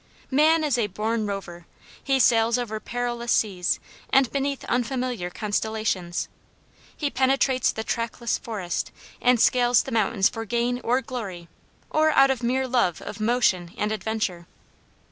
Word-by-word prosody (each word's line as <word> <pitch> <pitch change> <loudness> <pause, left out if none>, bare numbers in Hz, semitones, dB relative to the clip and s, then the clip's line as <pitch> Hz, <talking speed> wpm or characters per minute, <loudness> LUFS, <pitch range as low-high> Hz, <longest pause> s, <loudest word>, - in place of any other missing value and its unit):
Man 310 +4 +4
is 280 -5 +1
a 215 - +1
born 215 +2 -2
rover. 175 -4 -6 0.4
He 270 -1 +2
sails 230 -1 +4
over 220 -3 -3
perilous 240 0 -3
seas 185 -5 +1 0.3
and 265 -3 +4
beneath 275 0 -2
unfamiliar 245 -5 -1
constellations. 205 -3 -2 0.7
He 290 -2 -1
penetrates 260 -1 +2
the 220 - -5
trackless 230 0 -2
forest 195 -7 -4 0.3
and 250 -1 +4
scales 245 0 +4
the 270 - -7
mountains 215 -3 +2
for 225 - -5
gain 240 +2 -1
or 250 +3 +2
glory 195 -10 -6 0.4
or 310 0 +3
out 270 0 +6
of 260 -2 -2
mere 260 +2 0
love 240 -9 +1
of - - -7
motion 215 -6 +1
and 210 +1 -1
adventure. 215 -5 -3
235 Hz, 145 wpm, -25 LUFS, 210-255 Hz, 0.7 s, out